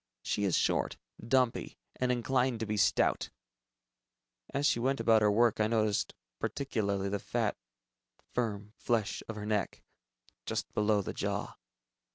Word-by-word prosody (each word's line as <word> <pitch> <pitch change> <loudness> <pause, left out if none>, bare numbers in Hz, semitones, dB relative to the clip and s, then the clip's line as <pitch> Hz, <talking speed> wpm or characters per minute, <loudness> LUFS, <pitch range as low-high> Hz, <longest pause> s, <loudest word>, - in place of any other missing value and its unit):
She 105 - 0
is 95 - +2
short, - - +1 0.3
dumpy, 125 -1 +1 0.2
and 125 0 +1
inclined 125 0 +1
to - - 0
be 105 0 -2
stout. 105 - +2 1.2
As 140 +1 0
she 120 - +3
went 135 +3 +1
about 110 -1 +5
her 105 - +5
work, 115 +2 +3
I 110 - +3
noticed 110 -2 +1 0.2
particularly 100 -8 -1
the 100 +1 -1
fat - - -1 0.8
firm 105 -3 -2
flesh 110 -3 0
of 110 - -4
her 105 -1 -5
neck, 105 -1 -1 0.6
just - - -3
below 105 -1 +2
the - - -4
jaw. - - -3
110 Hz, 145 wpm, -31 LUFS, 105-120 Hz, 1.2 s, about